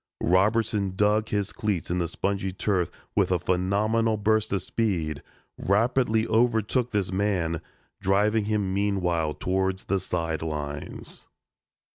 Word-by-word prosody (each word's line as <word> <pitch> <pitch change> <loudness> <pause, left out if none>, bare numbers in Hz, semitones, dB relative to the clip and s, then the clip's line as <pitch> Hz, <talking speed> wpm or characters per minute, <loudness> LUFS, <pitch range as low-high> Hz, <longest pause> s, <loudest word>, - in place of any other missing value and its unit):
Robertson 100 +1 +2
dug 105 +2 +2
his 100 -2 -1
cleats 105 -7 -2
in 90 - 0
the 85 - 0
spongy 95 +3 -2
turf 95 -2 0 0.3
with - - +2
a 90 - +4
phenomenal 100 +6 +1
burst 110 +1 +1
of 95 -2 0
speed, 85 -11 -1 0.4
rapidly 115 +2 +2
overtook 115 +2 +1
his 100 -3 0
man, 95 -5 0 0.4
driving 105 +3 +2
him 105 -3 0
meanwhile 90 -6 0
towards 95 0 -1
the 100 - 0
sidelines. 80 -4 -4
100 Hz, 120 wpm, -26 LUFS, 90-110 Hz, 0.4 s, a